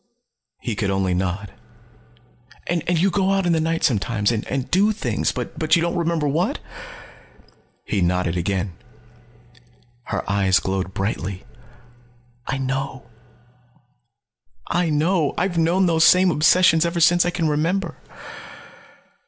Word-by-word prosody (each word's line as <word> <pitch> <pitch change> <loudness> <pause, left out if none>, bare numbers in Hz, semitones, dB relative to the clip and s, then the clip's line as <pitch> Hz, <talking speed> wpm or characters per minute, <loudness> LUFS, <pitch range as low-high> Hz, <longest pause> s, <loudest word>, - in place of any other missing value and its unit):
He 115 - -4
could 100 -1 -1
only 95 -1 0
nod. 95 +3 -3 1.1
"And 175 -1 -1 0.2
you 190 +3 +2
go 195 +1 +1
out 195 -1 0
in 175 - +2
the 160 - +1
night 165 +1 -1
sometimes 110 -4 +1
and 125 +4 -3
do 200 +4 +3
things 215 - -1
but 160 -1 -1
you 170 - +1
don't 170 +1 -1
remember 170 -3 0
what?" 155 +5 0 1.3
He 100 - -1
nodded 90 -1 0
again. 90 +1 -2 1.3
Her - - -4
eyes 100 -2 +2
glowed 95 -1 -3
brightly. 95 -1 -3 1.0
"I 135 - -2
know. 135 -1 -4 1.7
I 175 -1 +1
know. 155 +1 +1
I've 180 -2 0
known 175 +4 +2
those 165 -2 +3
same 185 +1 +5
obsessions 160 +1 +4
ever 170 0 -1
since 175 +1 +5
I 175 - 0
can 170 -2 -1
remember." 165 +4 -1
155 Hz, 130 wpm, -22 LUFS, -, 1.7 s, same